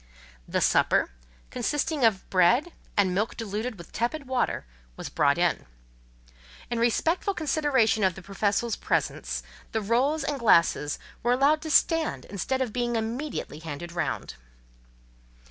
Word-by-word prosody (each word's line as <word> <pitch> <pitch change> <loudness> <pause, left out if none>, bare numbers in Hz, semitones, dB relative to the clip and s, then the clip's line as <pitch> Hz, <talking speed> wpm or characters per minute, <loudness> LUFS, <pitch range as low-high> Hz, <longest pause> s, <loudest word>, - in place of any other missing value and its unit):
The - - 0
supper, - - +3 0.4
consisting 295 +3 -1
of 220 -5 +3
bread, 235 - +4 0.3
and 190 -3 +3
milk 210 +5 -1
diluted 220 +1 -4
with 170 - -12
tepid 260 +6 -2
water, 255 - -1 0.3
was - - -6
brought - - +2
in. - - 0 1.0
In 235 - 0
respectful 325 - +1
consideration 275 -9 +2
of 185 -2 +2
the 190 - -10
Professor's 205 +4 0
presence, - - -2 0.3
the 220 - +1
rolls 260 +8 +1
and 280 0 -2
glasses 170 -9 +3 0.2
were 240 +1 +2
allowed 285 +4 +3
to 315 - -5
stand 325 +1 +2
instead 260 +7 -1
of 230 -5 -6
being 240 -1 -1
immediately 230 - -3
handed 165 +1 -7
round. 170 - -3
235 Hz, 135 wpm, -27 LUFS, 200-280 Hz, 1.0 s, bread